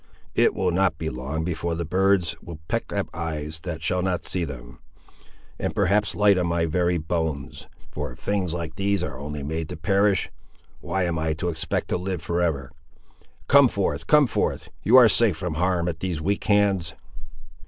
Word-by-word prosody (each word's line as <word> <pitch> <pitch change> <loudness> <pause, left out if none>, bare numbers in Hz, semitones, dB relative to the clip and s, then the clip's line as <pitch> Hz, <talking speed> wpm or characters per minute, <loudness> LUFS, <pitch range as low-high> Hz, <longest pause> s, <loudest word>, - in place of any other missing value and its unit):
It - - +3
will 95 -2 +1
not 90 -2 +1
be 80 -1 -3
long 70 +6 -4
afore 85 -1 -2
the 85 0 -3
birds 95 0 +2
will 85 -2 -9
peck - - -2
at - - -1
eyes 80 -1 -4
that 80 -1 -6
shall 90 +2 +1
not 90 -1 -1
see 90 - 0
them, - - -8 0.8
and - - -2
perhaps 100 +1 +2
light 100 -2 +4
on 90 - 0
my 85 0 +1
very 85 +2 +1
bones; 80 -3 -3 0.2
for 75 -3 -4
if - - -12
things 100 -4 -1
like 85 -2 -4
these 100 0 0
are 70 -3 -5
only 75 0 -5
made 80 +2 -3
to - - -6
perish, 100 +3 +2 0.5
why 90 +2 -2
am 85 -2 -1
I 80 0 0
to 80 +3 -2
expect 80 -1 -2
to - - +1
live 90 -2 -4
for 85 +1 -1
ever? 70 -6 -1 0.8
Come 140 -1 +7
forth, 100 -5 -2
come 150 -1 +6
forth; 120 - -1
you 115 +7 +6
are 125 -3 +9
safe 110 -5 +3
from 90 -1 -3
harm 90 +1 0
at 80 -2 -3
these 90 -4 -2
weak 100 +6 -1
hands." 100 -5 +2
85 Hz, 190 wpm, -24 LUFS, 80-95 Hz, 0.8 s, are